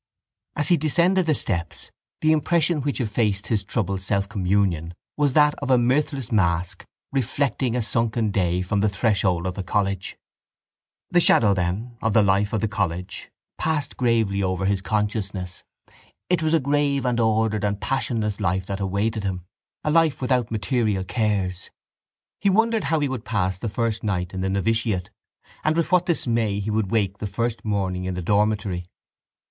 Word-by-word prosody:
As 145 Hz, -, +1 dB
he 175 Hz, -, +5 dB
descended 170 Hz, +4 st, +2 dB
the 155 Hz, -, +3 dB
steps 85 Hz, -8 st, -3 dB, 0.3 s
the 155 Hz, -, +4 dB
impression 160 Hz, 0 st, +2 dB
which 145 Hz, +1 st, -2 dB
effaced 105 Hz, -4 st, 0 dB
his 105 Hz, -4 st, 0 dB
troubled 100 Hz, -2 st, -2 dB
selfcommunion 100 Hz, -4 st, 0 dB, 0.2 s
was 145 Hz, -3 st, +1 dB
that 150 Hz, 0 st, +5 dB
of 140 Hz, -, -4 dB
a 130 Hz, -, +5 dB
mirthless 135 Hz, +1 st, 0 dB
mask 85 Hz, -4 st, 0 dB, 0.2 s
reflecting 135 Hz, -2 st, 0 dB
a 125 Hz, -, 0 dB
sunken 115 Hz, -1 st, 0 dB
day 90 Hz, -2 st, 0 dB
from 100 Hz, +2 st, -1 dB
the 105 Hz, +1 st, +2 dB
threshold 100 Hz, -4 st, +1 dB
of 90 Hz, -, -2 dB
the 100 Hz, -, -5 dB
college. 95 Hz, 0 st, -2 dB, 0.9 s
The 175 Hz, -, +5 dB
shadow, 110 Hz, -11 st, +5 dB
then, 100 Hz, +7 st, -2 dB
of 110 Hz, -1 st, 0 dB
the 110 Hz, -, +5 dB
life 100 Hz, +1 st, +2 dB
of 110 Hz, -, -1 dB
the 110 Hz, -, +1 dB
college 95 Hz, -3 st, -3 dB, 0.3 s
passed 155 Hz, -2 st, -1 dB
gravely 115 Hz, -5 st, +1 dB
over 95 Hz, 0 st, -1 dB
his 100 Hz, 0 st, +1 dB
consciousness. 100 Hz, -3 st, -2 dB, 0.7 s
It 180 Hz, -, +3 dB
was 160 Hz, +1 st, +2 dB
a -, -, +4 dB
grave 140 Hz, -1 st, +1 dB
and 120 Hz, -1 st, +1 dB
ordered 110 Hz, -2 st, +1 dB
and 100 Hz, -1 st, -1 dB
passionless 110 Hz, -3 st, -1 dB
life 95 Hz, -2 st, 0 dB
that 100 Hz, +1 st, -4 dB
awaited 100 Hz, +3 st, -1 dB
him, 95 Hz, -2 st, -2 dB, 0.4 s
a 150 Hz, -, 0 dB
life 160 Hz, -2 st, +3 dB
without 125 Hz, -3 st, 0 dB
material 110 Hz, -3 st, 0 dB
cares. 95 Hz, -3 st, -1 dB, 0.7 s
He 200 Hz, -, +2 dB
wondered 225 Hz, +2 st, +2 dB
how 160 Hz, -2 st, +1 dB
he 145 Hz, -, +1 dB
would 130 Hz, -4 st, -4 dB
pass 95 Hz, -6 st, -1 dB
the 115 Hz, -, -3 dB
first 115 Hz, +1 st, -2 dB
night 90 Hz, -4 st, -2 dB
in 95 Hz, -, -3 dB
the 95 Hz, -, -1 dB
novitiate 100 Hz, -1 st, 0 dB, 0.5 s
and 155 Hz, +1 st, +1 dB
with 170 Hz, -, 0 dB
what 180 Hz, -1 st, +3 dB
dismay 115 Hz, -, 0 dB
he 105 Hz, +2 st, -2 dB
would 105 Hz, -2 st, 0 dB
wake 100 Hz, -2 st, 0 dB
the 105 Hz, -, -3 dB
first 115 Hz, +4 st, -2 dB
morning 95 Hz, -3 st, -1 dB
in 95 Hz, -1 st, -3 dB
the 90 Hz, -, -4 dB
dormitory. 100 Hz, -2 st, 0 dB
110 Hz, 170 wpm, -23 LUFS, 95-130 Hz, 0.9 s, he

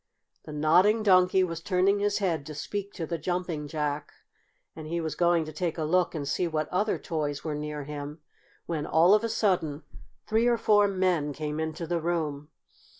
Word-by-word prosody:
The -, -, -8 dB
Nodding 180 Hz, +9 st, +3 dB
Donkey 185 Hz, -1 st, +5 dB
was 165 Hz, -2 st, -3 dB
turning 190 Hz, +3 st, +2 dB
his 205 Hz, 0 st, +1 dB
head 170 Hz, -7 st, 0 dB
to 155 Hz, -, -7 dB
speak 200 Hz, +6 st, -4 dB
to 165 Hz, -, -4 dB
the 170 Hz, +1 st, -4 dB
Jumping 175 Hz, -2 st, -3 dB
Jack, 150 Hz, -1 st, -3 dB, 0.6 s
and 155 Hz, -1 st, -8 dB
he 170 Hz, +2 st, -2 dB
was 160 Hz, -3 st, -3 dB
going 170 Hz, 0 st, +2 dB
to 155 Hz, -, -8 dB
take 170 Hz, +2 st, -2 dB
a 160 Hz, -, -1 dB
look 175 Hz, +3 st, +1 dB
and 145 Hz, -3 st, -3 dB
see 175 Hz, +5 st, 0 dB
what 155 Hz, -2 st, -1 dB
other 205 Hz, +4 st, 0 dB
toys 150 Hz, -4 st, -3 dB
were 155 Hz, -, -3 dB
near 150 Hz, 0 st, -4 dB
him, 145 Hz, +1 st, -7 dB, 0.5 s
when, 155 Hz, -3 st, -3 dB
all 170 Hz, +5 st, +5 dB
of 215 Hz, +1 st, +4 dB
a 230 Hz, -, -1 dB
sudden, 175 Hz, -9 st, 0 dB, 0.4 s
three 225 Hz, +2 st, +2 dB
or 240 Hz, -1 st, +3 dB
four 205 Hz, -2 st, +4 dB
men 180 Hz, -6 st, 0 dB
came 150 Hz, +1 st, -4 dB
into 160 Hz, +1 st, -3 dB
the 170 Hz, 0 st, -1 dB
room. 155 Hz, -3 st, -2 dB
165 Hz, 195 wpm, -28 LUFS, 150-185 Hz, 0.6 s, Donkey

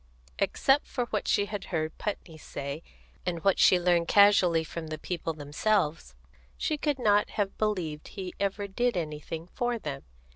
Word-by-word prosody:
Except 275 Hz, +2 st, +2 dB
for 245 Hz, -, -2 dB
what -, -, -1 dB
she 205 Hz, -, +3 dB
had 205 Hz, -1 st, -5 dB
heard 160 Hz, -3 st, -2 dB
Putney 195 Hz, -5 st, -4 dB
say, 140 Hz, +1 st, -6 dB, 0.4 s
and 170 Hz, -2 st, -3 dB
what 195 Hz, -1 st, +3 dB
she 185 Hz, -, +6 dB
learned 175 Hz, -1 st, +2 dB
casually 195 Hz, -5 st, +5 dB
from 160 Hz, 0 st, -6 dB
the 155 Hz, 0 st, -4 dB
people 165 Hz, 0 st, -3 dB
themselves, 150 Hz, -, -1 dB, 0.4 s
she 310 Hz, -, 0 dB
could 295 Hz, -1 st, -1 dB
not 210 Hz, -4 st, +3 dB
have 200 Hz, -2 st, -2 dB
believed 180 Hz, -8 st, -1 dB
he 185 Hz, -3 st, -6 dB
ever 200 Hz, +1 st, -1 dB
did 240 Hz, +2 st, 0 dB
anything 160 Hz, 0 st, -4 dB
for 240 Hz, +6 st, -2 dB
them. 145 Hz, -9 st, -5 dB
180 Hz, 160 wpm, -29 LUFS, 160-205 Hz, 0.4 s, she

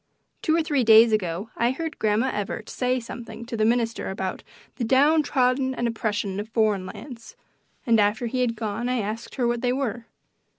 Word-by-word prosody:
Two 315 Hz, -, +2 dB
or 330 Hz, -, +2 dB
three 290 Hz, -5 st, +1 dB
days 225 Hz, 0 st, +7 dB
ago 190 Hz, 0 st, -1 dB
I 235 Hz, -, +2 dB
heard 315 Hz, +4 st, -4 dB
Grandma 215 Hz, +3 st, +1 dB
Evarts 210 Hz, +1 st, -4 dB
say 255 Hz, 0 st, 0 dB
something 235 Hz, -1 st, -8 dB
to 235 Hz, 0 st, -5 dB
the 220 Hz, -, +1 dB
minister 230 Hz, 0 st, 0 dB
about 190 Hz, -1 st, -4 dB, 0.4 s
"the 245 Hz, -, -2 dB
down 285 Hz, +7 st, +4 dB
trodden 260 Hz, -2 st, +1 dB
and 240 Hz, -, -1 dB
oppressed 225 Hz, 0 st, -1 dB
of 200 Hz, +2 st, -4 dB
foreign 215 Hz, -5 st, +1 dB
lands," 230 Hz, +3 st, -10 dB, 0.5 s
and 230 Hz, -3 st, +4 dB
after 210 Hz, +3 st, +2 dB
he 255 Hz, +2 st, -1 dB
had 235 Hz, -2 st, 0 dB
gone 220 Hz, +2 st, -3 dB
I 250 Hz, -, +1 dB
asked 220 Hz, +1 st, -4 dB
her 245 Hz, -3 st, +1 dB
what 240 Hz, 0 st, -1 dB
they 245 Hz, 0 st, +1 dB
were. 245 Hz, -3 st, -3 dB
235 Hz, 195 wpm, -25 LUFS, 215-255 Hz, 0.5 s, days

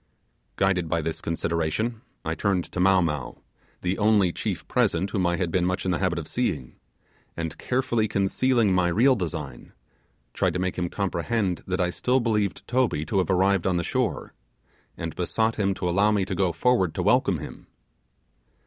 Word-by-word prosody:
Guided 90 Hz, -2 st, +1 dB
by 85 Hz, -1 st, 0 dB
this 80 Hz, 0 st, -3 dB
consideration, 85 Hz, +8 st, -1 dB, 0.2 s
I 80 Hz, -, -1 dB
turned 95 Hz, 0 st, 0 dB
to -, -, -4 dB
Mow 95 Hz, 0 st, +5 dB
Mow, 75 Hz, -5 st, -3 dB, 0.5 s
the 90 Hz, +3 st, -1 dB
only 105 Hz, -4 st, +3 dB
chief -, -, -4 dB
present 95 Hz, +4 st, +1 dB
whom 95 Hz, -5 st, +1 dB
I 85 Hz, -, +1 dB
had 90 Hz, -2 st, -2 dB
been 90 Hz, +1 st, +1 dB
much 90 Hz, +2 st, -1 dB
in 95 Hz, -, +1 dB
the 85 Hz, -, 0 dB
habit 90 Hz, -2 st, 0 dB
of 80 Hz, -3 st, -4 dB
seeing, 75 Hz, -, -2 dB, 0.6 s
and 80 Hz, -1 st, -3 dB
carefully 120 Hz, -3 st, 0 dB
concealing, 105 Hz, +2 st, +2 dB
my 90 Hz, -1 st, +3 dB
real 120 Hz, +10 st, +4 dB
design, 90 Hz, -8 st, -5 dB, 0.6 s
tried -, -, +1 dB
to -, -, -1 dB
make 90 Hz, 0 st, -1 dB
him 90 Hz, -1 st, -2 dB
comprehend 100 Hz, 0 st, -1 dB
that 90 Hz, -1 st, -1 dB
I 90 Hz, -1 st, +1 dB
still 125 Hz, +7 st, +1 dB
believed 105 Hz, -4 st, -1 dB
Toby 120 Hz, -12 st, +1 dB
to 95 Hz, +5 st, 0 dB
have 95 Hz, -, 0 dB
arrived 95 Hz, 0 st, +2 dB
on 90 Hz, -2 st, +1 dB
the 85 Hz, -, 0 dB
shore, -, -, -2 dB, 0.6 s
and 80 Hz, -1 st, -5 dB
besought 110 Hz, +5 st, 0 dB
him 100 Hz, -2 st, +1 dB
to 90 Hz, -, -3 dB
allow 100 Hz, +4 st, +3 dB
me 100 Hz, -3 st, +1 dB
to 95 Hz, -, -4 dB
go 90 Hz, -1 st, +1 dB
forward 95 Hz, 0 st, +1 dB
to -, -, -1 dB
welcome -, -, +3 dB
him. -, -, -9 dB
95 Hz, 185 wpm, -25 LUFS, 85-105 Hz, 0.6 s, Mow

